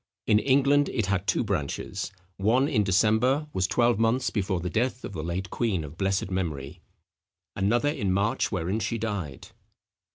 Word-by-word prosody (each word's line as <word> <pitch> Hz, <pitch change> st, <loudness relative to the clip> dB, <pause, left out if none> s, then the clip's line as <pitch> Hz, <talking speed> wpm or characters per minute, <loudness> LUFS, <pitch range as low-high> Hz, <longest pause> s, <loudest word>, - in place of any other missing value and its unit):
In 105 Hz, -1 st, +4 dB
England 140 Hz, +3 st, +3 dB
it 110 Hz, -5 st, -1 dB
had 100 Hz, 0 st, -1 dB
two -, -, +2 dB
branches; 95 Hz, -2 st, -3 dB, 0.3 s
one 120 Hz, +8 st, +3 dB
in 110 Hz, -8 st, +2 dB
December 110 Hz, -, +2 dB
was 95 Hz, 0 st, +1 dB
twelve 120 Hz, -1 st, +2 dB
months 115 Hz, +3 st, +1 dB
before 95 Hz, -3 st, -1 dB
the 90 Hz, -, -4 dB
death 120 Hz, +8 st, -1 dB
of -, -, -7 dB
the 80 Hz, -, -4 dB
late 90 Hz, +4 st, -4 dB
queen 105 Hz, -9 st, 0 dB
of 75 Hz, +1 st, -9 dB
blessed 95 Hz, +1 st, 0 dB
memory; 80 Hz, -3 st, -3 dB, 0.7 s
another 120 Hz, +9 st, +2 dB
in 105 Hz, -11 st, -1 dB
March, 100 Hz, +4 st, +1 dB
wherein 95 Hz, +2 st, -1 dB
she 115 Hz, +2 st, -2 dB
died." 100 Hz, -, -4 dB
105 Hz, 165 wpm, -27 LUFS, 95-120 Hz, 0.7 s, In